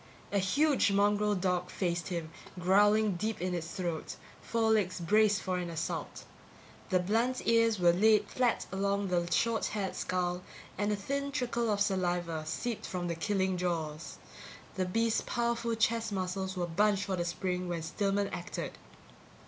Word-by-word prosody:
A 200 - +2
huge 275 +5 +3
mongrel 205 +1 +3
dog 180 -1 0
faced 175 -3 -2
him, 170 -3 -4 0.3
growling 205 +2 +4
deep 220 +4 -2
in 180 0 -2
its 170 -2 -3
throat, 175 -4 -4 0.3
four 225 -1 +1
legs 195 -5 +1
braced 210 +4 +3
for 185 -1 -1
assault. 170 -3 -4 0.7
The 185 -3 +3
blunt 230 +7 0
ears 230 -1 +4
were 175 -1 +5
laid 215 +4 +4
flat 245 -2 0
along 200 +1 0
the 175 -1 0
short 230 +3 +1
haired 200 -3 -3
skull 180 -1 -1 0.3
and 205 +2 0
a - - +2
thin 280 +8 -3
trickle 240 -3 -1
of 205 -1 0
saliva 175 -5 0
seeped 220 +9 -3
from 175 -1 -3
the 170 - -1
killing 190 +1 0
jaws. 165 -3 -3 0.6
The 185 - -1
beast's 225 +4 +1
powerful 235 -1 -1
chest 225 0 +1
muscles 190 0 -3
were 175 - 0
bunched 200 +4 +2
for 195 - -1
the 175 - -1
spring 180 +1 -2
when 170 -2 -3
Stillman 200 +4 0
acted. - - -5
195 Hz, 155 wpm, -31 LUFS, 180-215 Hz, 0.7 s, were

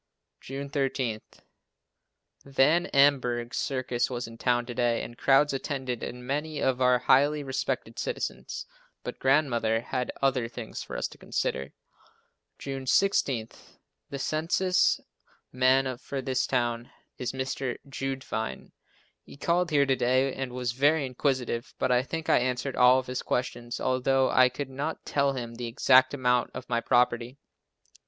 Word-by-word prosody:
June 140 +1 -6
13. 135 -5 -1 1.2
Van 140 +5 +3
Amburgh's 125 -3 +2
circus 130 -3 -1
was 120 -1 -3
in 115 - -11
town 120 +1 +1
to 120 - -6
day 120 -1 +1
and 120 - -8
crowds 140 +3 +3
attended 130 -3 -3
and 125 0 -6
many 150 +3 -2
of 130 -1 0
our 125 0 +5
most 125 - -14
highly 145 +2 +4
respected 135 -2 -3
citizens, - - -4 0.4
but - - -6
Grandmother 120 -5 +2
had 125 +1 -3
other 130 -3 +1
things 115 -1 -7
for - - -6
us - - -1
to - - -15
consider. 70 - -2 0.8
June 135 -1 -6
16. 130 - +2 0.6
The 140 - -5
census 165 +6 +1 0.5
man 130 +1 +3
for 140 - -5
this 130 -1 -1
town 120 -2 -1 0.3
is 125 - -2
Mr. 130 -1 -3
Jeudevine. 135 -4 -4 0.5
He - - -14
called 170 +4 +1
here 145 -3 +3
to 135 -1 +2
day 130 +2 +2
and 135 -2 -4
was 125 -1 -2
very 145 +4 +2
inquisitive, 130 -2 -2
but 130 - 0
I 125 0 +4
think 160 +4 -5
I - - +5
answered 125 +2 -2
all 125 +1 +6
of 130 - -1
his 125 0 -3
questions 120 -1 -3
although 130 +1 +2
I 130 0 +6
could 135 +1 -6
not 145 +4 -4
tell 140 -1 +1
him 120 -3 -5
the 120 0 -5
exact 130 +3 +4
amount 125 -2 +1
of - - -7
my 115 -1 +1
property. 120 +1 +1
130 Hz, 150 wpm, -28 LUFS, 125-140 Hz, 1.2 s, all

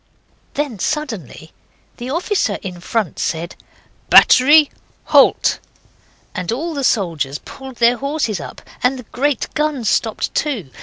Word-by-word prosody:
Then 280 -8 -3
suddenly 220 - -4 0.5
the 245 +1 -6
officer 335 - 0
in 180 -2 -6
front 210 -2 -2
said, 170 +1 -3 0.5
'Battery! 295 +3 +7 0.3
Halt!' - - +4 0.7
and 180 +1 -3
all 320 +8 -3
the 280 -2 -3
soldiers 165 - 0
pulled 265 - -11
their 240 +1 +3
horses 275 - -2
up, - - -9 0.2
and 255 +2 +1
the 250 - -9
great 280 0 -1
guns 300 -7 -1
stopped 225 -2 -1
too. 235 - -2
245 Hz, 125 wpm, -18 LUFS, 195-290 Hz, 0.7 s, Battery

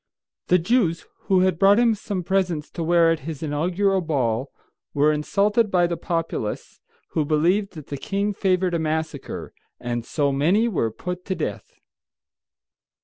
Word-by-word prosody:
The 180 - +5
Jews, 180 -3 +1 0.2
who 190 -2 +4
had 185 -3 +1
brought 200 +1 +6
him 235 -1 +4
some 200 -3 -4
presents 180 -5 -1
to - - -6
wear 165 0 +4
at 165 - 0
his 155 +1 -7
inaugural 180 +6 +1
ball, 135 -5 -1 0.5
were 150 +2 +4
insulted 205 +8 +1
by 180 -2 +3
the 170 0 -1
populace, 165 -10 -3 0.3
who 155 - 0
believed 175 +8 +1
that 155 -5 -9
the 140 - -4
king 200 +7 -2
favored 185 -2 +1
a 170 - +1
massacre, 160 -2 -3 0.3
and 120 -1 -3
so 140 +3 0
many 175 +12 +2
were 160 - 0
put 180 +10 -6
to 190 - -2
death. - - -5
170 Hz, 155 wpm, -23 LUFS, 150-195 Hz, 0.5 s, brought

